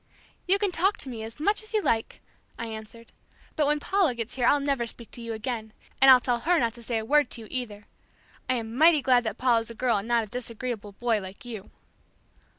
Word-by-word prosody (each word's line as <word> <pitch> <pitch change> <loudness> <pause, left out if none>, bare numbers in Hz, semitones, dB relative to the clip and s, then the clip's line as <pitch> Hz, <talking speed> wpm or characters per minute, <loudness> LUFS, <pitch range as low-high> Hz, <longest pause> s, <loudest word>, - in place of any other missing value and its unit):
"You 385 +2 +4
can 400 -2 0
talk 380 +4 +1
to 270 - -2
me 230 -3 -6
as 225 +5 -8
you 430 +5 0
like," 225 -1 -1 0.4
I 230 - -4
answered, 225 +1 -9 0.4
"but 300 -2 +2
when 300 0 +2
Paula 365 -5 +1
gets 230 0 -5
here 245 -2 +1
I'll 290 - +5
never 275 -4 -1
speak 230 0 -8
to 240 - -9
you 230 0 -5
again, 220 -1 -4 0.3
and 270 - +8
I'll 255 -1 +10
tell 245 -1 0
her 340 +8 +2
not 235 -6 +1
to 240 - -12
say 230 0 -2
a 220 - -3
word 295 +4 +3
to 235 - -7
you 220 - -10
either. 220 -5 -5 0.6
I 255 - +3
am 225 -1 -4
mighty 310 0 +5
glad 250 -2 +4
that 220 - -3
Paula's 235 -3 +2
a 230 - -8
girl 240 -2 +1
and 200 +2 -4
not 235 -1 +2
a - - -8
disagreeable 230 -2 -5
boy 230 0 0
like 190 +4 -10
you." 220 -5 -8
240 Hz, 230 wpm, -27 LUFS, 225-280 Hz, 0.6 s, I'll